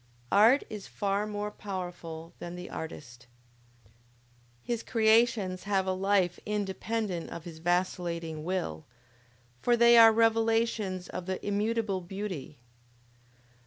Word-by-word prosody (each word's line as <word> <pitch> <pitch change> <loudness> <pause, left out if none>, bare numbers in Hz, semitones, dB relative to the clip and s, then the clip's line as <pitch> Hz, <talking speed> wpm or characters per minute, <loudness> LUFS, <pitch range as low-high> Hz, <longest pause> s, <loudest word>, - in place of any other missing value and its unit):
Art 225 +7 +6
is 210 -2 -8
far 200 0 -1
more 210 0 -4
powerful 175 -5 -7
than 175 0 -6
the 180 0 -8
artist. 125 -6 -8 1.4
His 235 -2 -2
creations 220 -4 +2
have 195 -2 +1
a 190 - 0
life 190 -2 +1
independent 205 -2 -2
of 170 - -7
his 165 -2 -9
vacillating 170 -2 -1
will; 160 - -3 0.8
for 240 -1 +3
they 235 0 +7
are 225 -1 +9
revelations 225 -4 +1
of 180 0 -6
the 190 0 -1
"immutable 210 -1 0
beauty!" 180 -6 -6
195 Hz, 115 wpm, -29 LUFS, 175-220 Hz, 1.4 s, are